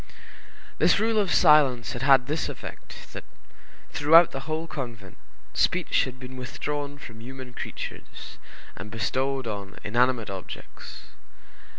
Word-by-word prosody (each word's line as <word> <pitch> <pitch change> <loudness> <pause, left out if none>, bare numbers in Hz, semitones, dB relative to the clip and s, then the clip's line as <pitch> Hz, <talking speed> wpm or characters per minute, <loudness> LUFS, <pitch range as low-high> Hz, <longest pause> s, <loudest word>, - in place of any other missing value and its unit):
This - - +4
rule 225 0 +2
of 195 -4 +1
silence 140 -8 +5
had 125 - -5
had 135 -2 +5
this 155 +4 -2
effect, - - -10
that - - -6 0.7
throughout 165 +3 +6
the 135 +3 -7
whole 160 +1 -1
convent, 120 - -7 0.4
speech - - +2
had 130 0 -8
been 130 0 -9
withdrawn 145 +3 -4
from 115 -5 -11
human 130 +1 -9
creatures, - - -8 0.4
and 100 - -8
bestowed 130 +4 -1
on 100 -3 -5
inanimate 120 0 +1
objects. 95 -1 -9
130 Hz, 125 wpm, -26 LUFS, 115-145 Hz, 0.7 s, throughout